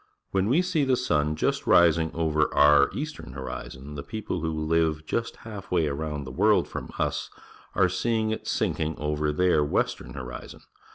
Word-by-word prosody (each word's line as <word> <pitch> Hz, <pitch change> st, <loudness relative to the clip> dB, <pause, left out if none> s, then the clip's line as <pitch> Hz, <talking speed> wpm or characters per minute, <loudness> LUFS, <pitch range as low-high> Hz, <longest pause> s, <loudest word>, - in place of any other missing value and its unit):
When 95 Hz, 0 st, +1 dB
we 160 Hz, +9 st, +3 dB
see 175 Hz, -5 st, +1 dB
the 130 Hz, -1 st, +3 dB
sun 75 Hz, -10 st, +1 dB
just -, -, -1 dB
rising 85 Hz, -1 st, +5 dB
over 80 Hz, -2 st, +1 dB
our 75 Hz, -1 st, +6 dB
eastern 150 Hz, -, -6 dB
horizon, 65 Hz, +1 st, -7 dB
the 70 Hz, -, -5 dB
people 110 Hz, +8 st, -4 dB
who 80 Hz, -1 st, -2 dB
live 80 Hz, -1 st, +1 dB
just 115 Hz, +7 st, -2 dB
half 105 Hz, -4 st, -8 dB
way 85 Hz, -3 st, +2 dB
around 75 Hz, 0 st, -3 dB
the 65 Hz, -, -8 dB
woi'ld -, -, +3 dB
from -, -, -6 dB
us -, -, -1 dB, 0.5 s
are -, -, +4 dB
seeing 110 Hz, +4 st, 0 dB
it 110 Hz, -, -4 dB
sinking 80 Hz, 0 st, -1 dB
over 75 Hz, 0 st, -1 dB
their 85 Hz, -1 st, +3 dB
western 75 Hz, -, -1 dB
horizon. 60 Hz, -2 st, -8 dB
80 Hz, 170 wpm, -26 LUFS, 75-100 Hz, 0.5 s, our